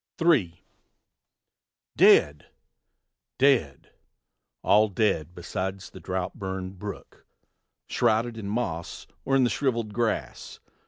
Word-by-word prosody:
III. 130 - +1 1.3
Dead! 75 0 +4 0.9
dead! 130 - +1 0.7
all 105 +1 +4
dead 90 -5 -1
besides 95 +2 -5
the 95 - -11
drouth 90 +1 -3
burnt 95 -1 -6
brook, 100 -3 -9 0.6
Shrouded 115 +2 +1
in 105 -3 -6
moss 85 -7 -4 0.2
or 135 - +1
in 135 - +4
the 120 - +2
shriveled 115 -6 -1
grass. 115 0 -3
100 Hz, 100 wpm, -26 LUFS, 90-115 Hz, 1.3 s, Dead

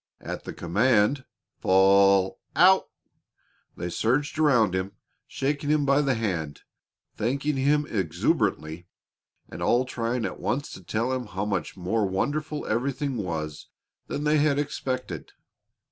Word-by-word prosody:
At - - -7
the - - -5
command, 110 +7 +2 0.3
"Fall 95 0 +4 0.2
out!" 190 +2 +5 0.9
they 85 0 -4
surged 145 - 0
around 120 -11 +4
him, 95 +1 -2 0.3
shaking 145 +1 -2
him 150 -1 +2
by 140 +1 +4
the 135 -3 +1
hand, 85 -10 -3 0.6
thanking 140 +6 -1
him 145 +2 +2
exuberantly, 85 -3 -1 0.6
and - - -9
all 125 +2 +2
trying 120 -1 -2
at - - -5
once 140 +3 -2
to - - -10
tell 115 +8 -1
him 125 -3 -3
how 95 0 -3
much 95 -3 -3
more 95 +4 0
wonderful 150 +10 -2
everything 135 +4 -1
was 80 -7 -4 0.4
than 145 - -3
they 150 +1 +3
had 145 -1 +2
expected. 130 -3 -4
120 Hz, 130 wpm, -26 LUFS, 95-140 Hz, 0.9 s, out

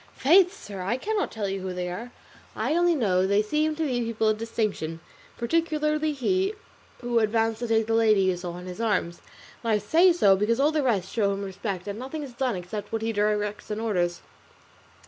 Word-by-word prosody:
"Faith, 360 +6 +5
sir, 205 - -9
I 200 +7 -1
cannot 425 +8 -1
tell 210 -3 -3
you 195 0 -3
who 185 -1 -4
they 180 0 -3
are, 215 +8 -6 0.4
I 310 - 0
only 345 0 +3
know 190 -8 +2
they 200 +2 +3
seem 305 +7 0
to 320 - -2
be 250 -4 0
people 225 -1 0
of 215 0 0
distinction, 215 -8 -2 0.4
particularly 305 +3 0
he 370 - 0 0.5
who 240 -1 +1
advanced 225 0 +1
to 240 - -3
take 225 -1 +2
the 225 - -1
lady 220 -3 +4
you 185 -1 +2
saw 175 -1 -6
in 180 - -9
his 185 +4 -6
arms; 180 -6 -1 0.4
and 230 - 0
I - - +4
say 325 - +4
so 205 - +5
because 215 +5 +1
all 290 +3 +4
the 310 -1 +1
rest 205 -9 0
show 205 -3 +2
him 200 +1 -4
respect, 195 -1 -5
and 200 +2 -4
nothing 270 +4 -5
is 265 -3 -9
done 250 -1 -1
except 180 +4 -6
what 225 0 -2
he 225 0 -1
directs 210 0 -1
and 210 0 -3
orders." 175 -6 -1
225 Hz, 210 wpm, -26 LUFS, 195-270 Hz, 0.5 s, Faith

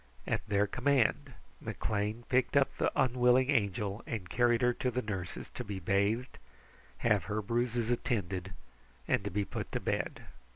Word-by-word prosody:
At - - 0
their 100 0 +3
command, 135 +2 +1 0.3
McLean 105 +2 -2
picked 130 +2 +2
up 140 - +3
the - - +1
unwilling 125 +1 +4
Angel 100 -3 0
and 105 -6 -4
carried 120 +2 +3
her 125 0 +4
to 125 - -1
the 125 +1 -2
nurses 95 -4 -5
to 125 - -5
be 100 -3 -5
bathed, 100 +7 0 0.6
have 105 -6 +2
her 105 0 -1
bruises 120 +2 0
attended, 95 -6 -1 0.6
and - - +2
to 100 - -2
be 100 +2 -1
put - - -5
to - - 0
bed. - - -2
115 Hz, 160 wpm, -32 LUFS, 100-125 Hz, 0.6 s, unwilling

